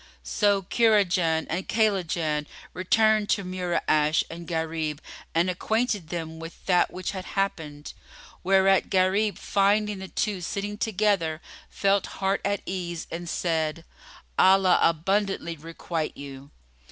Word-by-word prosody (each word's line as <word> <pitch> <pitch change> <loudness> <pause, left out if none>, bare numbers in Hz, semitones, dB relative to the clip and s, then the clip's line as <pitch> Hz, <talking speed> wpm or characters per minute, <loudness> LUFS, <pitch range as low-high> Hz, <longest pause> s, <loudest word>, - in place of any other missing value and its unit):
So 205 -2 +1
Kurajan 180 -7 +2
and 180 +4 -3
Kaylajan 170 -8 0 0.3
returned 215 +3 +2
to 200 - +1
Mura'ash 175 -4 +1
and 170 0 -8
Gharib; 160 -3 -2 0.4
and 170 +2 +3
acquainted 205 0 -1
them 160 -2 -5
with 165 +1 -10
that 180 -2 +3
which 185 0 -4
had 185 -2 -6
happened, 155 -7 -2 0.5
whereat 195 +1 +4
Gharib 195 +3 +2
finding 205 0 +1
the 190 - -7
two 200 -1 -2
sitting 205 +4 -4
together 195 -8 +1 0.3
felt 195 0 +1
heart 195 0 0
at 200 0 -1
ease 175 -3 -4
and 170 +1 -5
said, 165 -1 -1 0.5
"Allah 190 -1 +5
abundantly 185 +1 +1
requite 165 0 -5
you!" 140 0 -9
185 Hz, 120 wpm, -26 LUFS, 165-200 Hz, 0.5 s, Allah